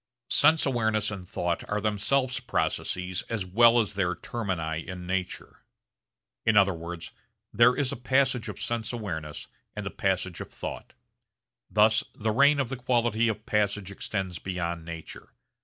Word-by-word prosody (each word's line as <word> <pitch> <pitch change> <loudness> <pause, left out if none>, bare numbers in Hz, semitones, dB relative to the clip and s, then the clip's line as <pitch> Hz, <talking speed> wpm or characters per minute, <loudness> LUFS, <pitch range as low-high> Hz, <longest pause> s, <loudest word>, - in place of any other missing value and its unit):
Sense 155 +2 +5
awareness 110 -5 +1
and 95 -3 -7
thought 85 -1 -1
are 105 - 0
themselves 125 +6 +1
processes 90 -6 -1
as 105 -5 -2
well 115 +5 +6
as 105 -2 0
their 95 -3 0
termini 85 -8 -3
in 90 -1 -6
nature. 90 0 -4 0.8
In 110 -1 +3
other 100 -1 +5
words 85 0 -7 0.4
there 125 +1 +6
is 140 -2 0
a - - -3
passage 125 -2 +1
of 100 -1 -7
sense 110 +1 -2
awareness 85 -11 -5 0.3
and - - -5
a - - -3
passage - - -1
of - - -8
thought. - - -7 0.8
Thus 110 +1 +4
the 110 +1 -1
reign 140 +5 +5
of 135 -4 0
the 135 - -4
quality 120 -2 +1
of 110 0 -2
passage 105 -2 0
extends 95 -3 -4
beyond 85 -3 -3
nature. 85 -1 -9
105 Hz, 155 wpm, -27 LUFS, 90-120 Hz, 0.8 s, well